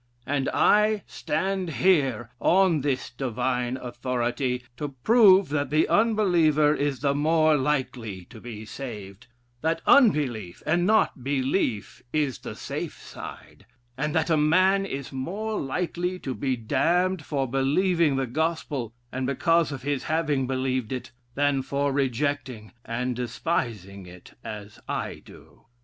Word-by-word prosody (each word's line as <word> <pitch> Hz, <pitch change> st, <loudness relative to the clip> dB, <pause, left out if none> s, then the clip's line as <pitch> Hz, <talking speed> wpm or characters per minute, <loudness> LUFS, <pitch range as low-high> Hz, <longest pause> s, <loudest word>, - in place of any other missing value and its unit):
And 140 Hz, -1 st, 0 dB
I 210 Hz, 0 st, +3 dB
stand 190 Hz, +3 st, -2 dB
here, 135 Hz, -, +2 dB
on 180 Hz, -4 st, +3 dB
this 135 Hz, -2 st, -2 dB
divine 125 Hz, 0 st, -2 dB
authority, 125 Hz, 0 st, -2 dB
to 145 Hz, -1 st, -5 dB
prove 200 Hz, -, +6 dB
that 145 Hz, -2 st, -1 dB
the 155 Hz, +1 st, +3 dB
unbeliever 175 Hz, -9 st, +3 dB
is 145 Hz, -3 st, -1 dB
the 140 Hz, -1 st, +2 dB
more 155 Hz, +1 st, +3 dB
likely 125 Hz, -9 st, -2 dB
to 110 Hz, -4 st, -12 dB
be 110 Hz, -3 st, -8 dB
saved: 105 Hz, -3 st, -8 dB, 0.3 s
that 165 Hz, +1 st, 0 dB
unbelief, 140 Hz, -, +3 dB
and 175 Hz, +3 st, +2 dB
not 215 Hz, -, +2 dB
belief, 130 Hz, -, -1 dB
is 145 Hz, -5 st, 0 dB
the -, -, -7 dB
safe -, -, -5 dB
side, 100 Hz, -, -11 dB, 0.3 s
and 150 Hz, +3 st, -2 dB
that 160 Hz, +1 st, +1 dB
a 160 Hz, -, +4 dB
man 185 Hz, +6 st, +3 dB
is 140 Hz, -5 st, -5 dB
more 200 Hz, +11 st, -3 dB
likely 180 Hz, +5 st, -2 dB
to 135 Hz, -7 st, -4 dB
be 130 Hz, 0 st, -1 dB
damned 175 Hz, +9 st, +1 dB
for 140 Hz, -4 st, -1 dB
believing 150 Hz, +4 st, +2 dB
the 135 Hz, 0 st, 0 dB
gospel, 145 Hz, -4 st, -2 dB, 0.2 s
and 130 Hz, 0 st, -2 dB
because 165 Hz, +4 st, +2 dB
of 135 Hz, -3 st, -6 dB
his 145 Hz, -1 st, -2 dB
having 150 Hz, -5 st, 0 dB
believed 130 Hz, -2 st, -1 dB
it, 125 Hz, -1 st, -5 dB, 0.2 s
than 145 Hz, -1 st, +2 dB
for 140 Hz, +1 st, -1 dB
rejecting 130 Hz, -4 st, -2 dB
and 125 Hz, +2 st, -2 dB
despising 115 Hz, -, -3 dB
it, 90 Hz, 0 st, -14 dB
as 105 Hz, -2 st, -8 dB
I -, -, -3 dB
do.... -, -, -17 dB
140 Hz, 135 wpm, -26 LUFS, 125-165 Hz, 0.3 s, prove